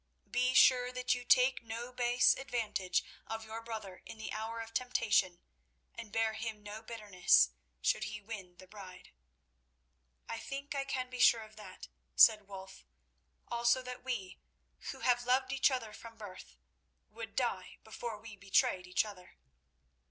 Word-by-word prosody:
Be 250 +1 +2
sure 250 -1 +6
that 250 0 0
you 245 0 -4
take 255 +1 +4
no 235 +2 -6
base 245 0 +4
advantage 220 -8 -1 0.2
of 225 0 -5
your 220 +1 -6
brother 215 -5 -7
in - - -10
the 220 - -6
hour 225 +2 -4
of 225 0 -7
temptation, 210 -8 +1 0.5
and 215 - -9
bear 225 0 +1
him 220 -1 -5
no 210 +1 -7
bitterness 210 - +3 0.3
should - - +2
he 215 -1 -5
win 200 -4 -8
the 185 - -13
bride." 185 -2 -12 1.2
"I 230 - -4
think 275 +4 -6
I 275 -1 -2
can 255 -2 -3
be 250 - -6
sure 230 -1 +6
of 215 0 -15
that," 195 -3 -10 0.3
said 210 -3 +7
Wulf; 190 - -10 0.6
"also 240 +2 +2
that 250 0 -7
we, 215 -8 -4 0.5
who - - -11
have 245 -1 +2
loved 260 +1 +2
each 270 +1 +4
other 240 -5 -3
from 230 0 -11
birth, 200 -4 -11 0.5
would - - -8
die - - -2
before 235 -3 -6
we 220 0 -11
betrayed 190 -2 +1
each 180 +4 +2
other." 185 -4 -12
225 Hz, 160 wpm, -33 LUFS, 205-250 Hz, 1.2 s, said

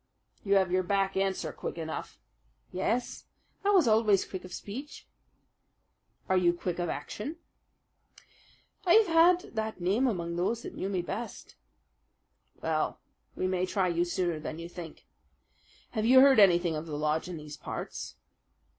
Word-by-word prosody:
"You 200 -1 +2
have 190 -2 +3
your 185 +1 +3
back 195 +1 0
answer 190 -4 -1
quick - - -6
enough." 160 -1 -5 0.5
"Yes, 230 +7 -2 0.4
I 400 - +2
was 375 -9 +5
always 215 -3 +4
quick 185 -2 -7
of 185 - -11
speech." 255 +11 -8 1.2
"Are 190 - +2
you 175 -2 +4
quick 175 0 -4
of 175 -1 -1
action?" 285 +10 -5 1.5
"I 350 - +4
have 445 0 +7 0.4
had - - -15
that 220 -2 -3
name 200 +9 +2
among 170 -6 -2
those 225 +7 -1
that - - -7
knew 190 - -3
me 185 -3 -1
best." 220 +6 -6 1.1
"Well, - - -1 0.4
we - - -2
may 185 0 0
try 185 -1 +1
you 170 0 +1
sooner 175 -2 -1
than 155 +1 -6
you 170 0 -6
think. 170 -2 -10 0.9
Have 215 0 -1
you 260 +1 +8
heard 270 -3 +7
anything 175 -4 +5
of 155 +2 -5
the 150 -2 -4
lodge 155 +3 0
in 175 - -5
these 150 -1 -8
parts?" - - -6
185 Hz, 155 wpm, -29 LUFS, 175-215 Hz, 1.5 s, you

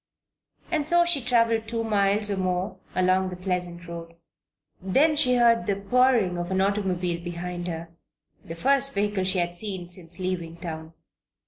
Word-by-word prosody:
And 305 -3 0
so 345 +1 +4
she 340 -5 +2
traveled 230 -2 +2
two 230 0 -2
miles, 205 -1 +2
or 200 - -1
more, 185 +1 -2 0.2
along 185 +1 +2
the 180 - -6
pleasant 180 -1 -4
road. 170 0 -8 0.7
Then 275 - +3
she 250 -4 +3
heard 230 -2 +4
the 200 - +1
purring 205 -3 +2
of 175 0 -4
an 190 0 0
automobile 185 -3 0
behind 175 0 -5
her 165 -1 -5 0.6
the 165 - -8
first 275 +7 +2
vehicle 205 +1 0
that - - -2
she 190 - 0
had 175 0 -1
seen 190 -2 -4
since 175 -1 -5
leaving 175 -3 -3
town. 160 -2 -7
190 Hz, 165 wpm, -25 LUFS, 175-225 Hz, 0.7 s, so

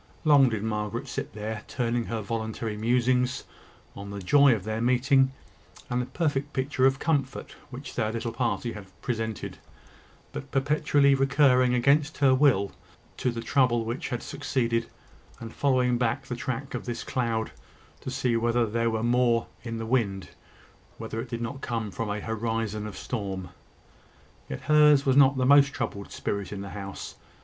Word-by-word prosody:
Long 145 -5 +6
did 110 -3 -3
Margaret 110 +4 -3
sit 120 - -5
there, 105 +1 -5
turning 120 -2 -1
her 115 -1 -3
voluntary 110 0 -3
musings 125 +3 +1 0.5
on 100 0 -8
the 100 - -6
joy 140 +7 +5
of 100 - -6
their 110 +2 -3
meeting, 130 +2 +3 0.6
and 125 0 +1
the 125 - -4
perfect 145 -3 -1
picture 130 0 +2
of 135 0 +1
comfort 140 -3 -1 0.2
which 135 +2 -8
their 110 -3 -1
little 115 0 -3
party 120 0 -1
had 105 -2 -9 0.2
presented; 110 -3 -3 0.7
but 65 - -6
perpetually 140 0 +3
recurring, 135 -2 +4
against 140 +5 +2
her 135 -2 +4
will, 130 -8 +3 0.5
to - - 0
the 115 -1 -4
trouble 120 -2 +2
which 115 +3 -4
had 120 - -3
succeeded, 115 -3 -1 0.5
and 115 -1 -8
following 125 -3 +2
back 115 -3 0
the 125 - -4
track 130 +3 -4
of - - -4
this 120 -2 -4
cloud, 115 -3 -1 0.5
to - - -6
see 125 -2 0
whether 120 +1 +2
there 115 +1 0
were 110 0 -2
more 120 -1 +3 0.2
in 115 -1 -5
the 115 - -4
wind 110 -6 0 0.7
whether 115 - -4
it 125 - -8
did 115 0 -4
not 135 +4 -5
come 115 -3 -3
from 110 +2 -4
a 100 +1 -2
horizon 110 -1 -2
of 100 -3 -8
storm. 95 -6 -4 1.0
Yet 65 - -5
hers 150 -2 +5
was 135 -1 +3
not 140 -1 +6
the 130 - +1
most 140 +1 +6
troubled 115 -7 -4
spirit 100 -2 -3
in 100 -1 -5
the 100 - -7
house. 100 -1 -7
120 Hz, 170 wpm, -27 LUFS, 110-135 Hz, 1.0 s, Long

